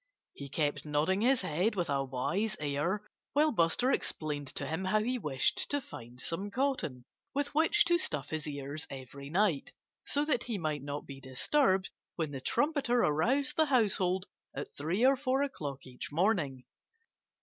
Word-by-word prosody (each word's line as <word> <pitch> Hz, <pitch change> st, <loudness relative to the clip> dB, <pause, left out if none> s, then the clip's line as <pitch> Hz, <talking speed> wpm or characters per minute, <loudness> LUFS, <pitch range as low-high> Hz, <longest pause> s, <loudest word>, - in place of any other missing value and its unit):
He 140 Hz, -1 st, -8 dB
kept 145 Hz, +1 st, 0 dB
nodding 155 Hz, +6 st, +1 dB
his 255 Hz, +2 st, +4 dB
head 185 Hz, +9 st, +1 dB
with 175 Hz, -3 st, 0 dB
a 140 Hz, -1 st, +1 dB
wise 135 Hz, +12 st, -1 dB
air 150 Hz, +8 st, -1 dB, 0.3 s
while 300 Hz, +2 st, +4 dB
Buster 215 Hz, -, +3 dB
explained 150 Hz, -, -1 dB
to -, -, -2 dB
him 165 Hz, +4 st, -2 dB
how 215 Hz, +3 st, +2 dB
he 250 Hz, +2 st, 0 dB
wished 135 Hz, -, 0 dB
to 285 Hz, -, +1 dB
find 120 Hz, -, -10 dB
some 185 Hz, +9 st, -3 dB
cotton, 205 Hz, -, -1 dB, 0.3 s
with 285 Hz, +1 st, -1 dB
which 330 Hz, +7 st, +4 dB
to 345 Hz, 0 st, +4 dB
stuff 150 Hz, -, -2 dB
his 155 Hz, -1 st, -3 dB
ears 145 Hz, +1 st, -4 dB
every 140 Hz, +1 st, -8 dB
night, 175 Hz, -3 st, +1 dB, 0.3 s
so 290 Hz, +1 st, +1 dB
that 255 Hz, -6 st, +1 dB
he 230 Hz, -4 st, -2 dB
might 155 Hz, -5 st, -2 dB
not 145 Hz, +1 st, -5 dB
be 135 Hz, -1 st, -9 dB
disturbed 190 Hz, -, +2 dB, 0.2 s
when 160 Hz, -4 st, -2 dB
the 135 Hz, -2 st, -5 dB
trumpeter 280 Hz, -, +2 dB
aroused 265 Hz, -, +2 dB
the 315 Hz, -, +5 dB
household 190 Hz, -7 st, +2 dB, 0.3 s
at 145 Hz, -, -6 dB
three 170 Hz, -, +1 dB
or 270 Hz, +1 st, +6 dB
four 270 Hz, 0 st, +1 dB
o'clock 145 Hz, -, -4 dB
each 125 Hz, +1 st, -8 dB
morning. 155 Hz, -, +1 dB
175 Hz, 170 wpm, -32 LUFS, -, 0.3 s, or